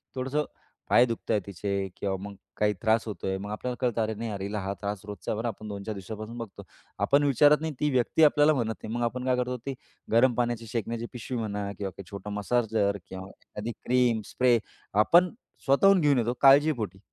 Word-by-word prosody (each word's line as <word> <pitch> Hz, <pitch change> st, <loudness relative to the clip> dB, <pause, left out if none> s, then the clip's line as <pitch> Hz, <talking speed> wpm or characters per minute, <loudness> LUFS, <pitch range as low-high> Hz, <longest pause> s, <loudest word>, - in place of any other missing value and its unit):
थोडंसं 135 Hz, +3 st, -1 dB, 0.4 s
पाय 120 Hz, -, +6 dB
दुखत 115 Hz, -2 st, -4 dB
आहेत 105 Hz, -, +2 dB
तिचे 100 Hz, 0 st, -3 dB
किंवा 95 Hz, -1 st, -1 dB
मग 100 Hz, 0 st, -7 dB, 0.2 s
काही 105 Hz, 0 st, +2 dB
त्रास 110 Hz, 0 st, +2 dB
होतोय. 95 Hz, -2 st, -3 dB
मग 100 Hz, +2 st, -6 dB
आपल्याला 125 Hz, +4 st, -3 dB
कळतं 120 Hz, -3 st, +1 dB
अरे 110 Hz, 0 st, -2 dB
नाही 115 Hz, +1 st, -4 dB
अरे, 100 Hz, -1 st, -4 dB
हा 100 Hz, -1 st, -2 dB
त्रास 100 Hz, -1 st, -3 dB
रोजचा 105 Hz, +1 st, -4 dB
बरं, 115 Hz, +3 st, -2 dB
आपण 110 Hz, -1 st, -6 dB
2-4 100 Hz, +1 st, -5 dB
दिवसापासून 110 Hz, +4 st, -7 dB
बघतो. 115 Hz, -4 st, -8 dB, 0.4 s
आपण 140 Hz, +1 st, +3 dB
विचारत 145 Hz, +2 st, +5 dB
नाही. 160 Hz, -1 st, -3 dB
ती 150 Hz, -, +2 dB
व्यक्ती 130 Hz, +5 st, +2 dB
आपल्याला 150 Hz, 0 st, +5 dB
म्हणत 115 Hz, -5 st, -1 dB
नाही. 110 Hz, -, -5 dB
मग 120 Hz, -, -1 dB
आपण 125 Hz, +2 st, -3 dB
काय 130 Hz, -1 st, +2 dB
करतो? 125 Hz, 0 st, -1 dB
ते 135 Hz, -, -2 dB, 0.4 s
गरम 120 Hz, +3 st, +5 dB
पाण्याची 120 Hz, -1 st, -1 dB
शेकण्याची 115 Hz, +1 st, -3 dB
पिशवी 125 Hz, +1 st, -5 dB
म्हणा 105 Hz, -3 st, -3 dB
किंवा 100 Hz, -2 st, -4 dB
काही 100 Hz, -, -11 dB
छोटं 100 Hz, 0 st, -7 dB
मसाजर 105 Hz, -1 st, 0 dB
किंवा 95 Hz, 0 st, -8 dB
एखादी 105 Hz, +3 st, -8 dB
क्रीम, 125 Hz, -3 st, +2 dB
स्प्रे 125 Hz, -2 st, +2 dB, 0.5 s
आपण 180 Hz, +1 st, +5 dB, 0.4 s
स्वतःहून 190 Hz, +8 st, +5 dB
घेऊन 145 Hz, -3 st, +4 dB
येतो 120 Hz, +1 st, 0 dB
काळजीपोटी. 135 Hz, -, +4 dB
115 Hz, 195 wpm, -27 LUFS, 105-125 Hz, 0.5 s, पाय